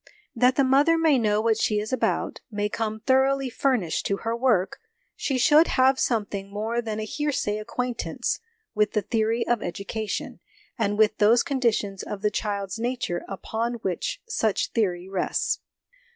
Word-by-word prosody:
That 250 +2 +4
the 275 - +3
mother 285 +5 +4
may 315 -5 +4
know 210 -2 +2
what 225 -1 +2
she 210 -1 +1
is 215 +4 -4
about, 255 - -1
may 210 -1 -2
come 220 0 -3
thoroughly 265 0 +2
furnished 235 - 0
to 200 - 0
her 230 +1 0
work, 235 -7 +1 0.4
she 270 - -1
should 300 +6 +5
have 260 +1 +4
something 205 -4 -1
more 220 +3 -2
than 220 -2 -4
a - - -2
hearsay 220 -4 -1
acquaintance 245 +3 -3 0.3
with 210 -1 +1
the 210 - +1
theory 225 0 0
of 240 -2 +1
education, 200 +4 -4 0.4
and 205 -4 0
with 215 0 +3
those 225 +3 +5
conditions 225 -8 0
of 205 0 -6
the 210 - +2
child's 200 -1 -3
nature 240 -6 -2
upon 225 +4 -3
which 195 - -2
such 220 - 0
theory 185 -5 0
rests. 190 -2 -1
225 Hz, 160 wpm, -25 LUFS, 210-255 Hz, 0.4 s, should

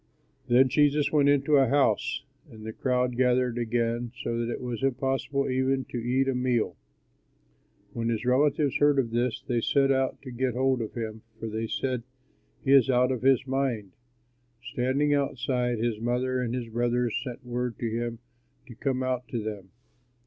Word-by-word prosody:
Then 125 +2 +5
Jesus 145 +2 +2
went 145 -2 +4
into 145 +1 +4
a 135 -1 +5
house 140 +2 +1 0.3
and 110 -1 -12
the 110 - -5
crowd 125 0 0
gathered 125 -1 +2
again 120 0 -1
so 120 - -2
that 120 0 -2
it - - -4
was 120 -3 -4
impossible 135 +1 0
even 130 0 0
to 120 - -2
eat 130 +3 +1
a 135 - +1
meal. 125 -2 0 1.2
When 115 -1 -2
his 115 0 -2
relatives 140 +2 +2
heard 145 -1 +4
of 120 -4 +1
this, 120 0 -1
they 120 -2 0
set 135 +3 +3
out 135 -1 0
to 130 - -8
get 125 0 -1
hold 130 -1 +1
of 110 - -6
him, 110 -2 -5 0.2
for 115 - -5
they 110 +1 -3
said, 130 +1 -2 0.6
"He 135 - +2
is 135 -3 +6
out 125 0 +3
of 125 - -2
his 135 0 +3
mind." 130 -7 -1 0.7
Standing 130 +4 0
outside, 125 -3 0
his 115 -1 -1
mother 125 +2 0
and 120 -1 -2
his 120 -2 -4
brothers 120 0 0
sent 125 -1 -8
word 125 -1 -3
to 120 - -2
him 115 +1 -3 0.5
to 125 - -11
come 130 +2 -1
out 125 -1 -2
to 115 -3 -3
them. 105 -3 -6
125 Hz, 180 wpm, -27 LUFS, 120-135 Hz, 1.2 s, is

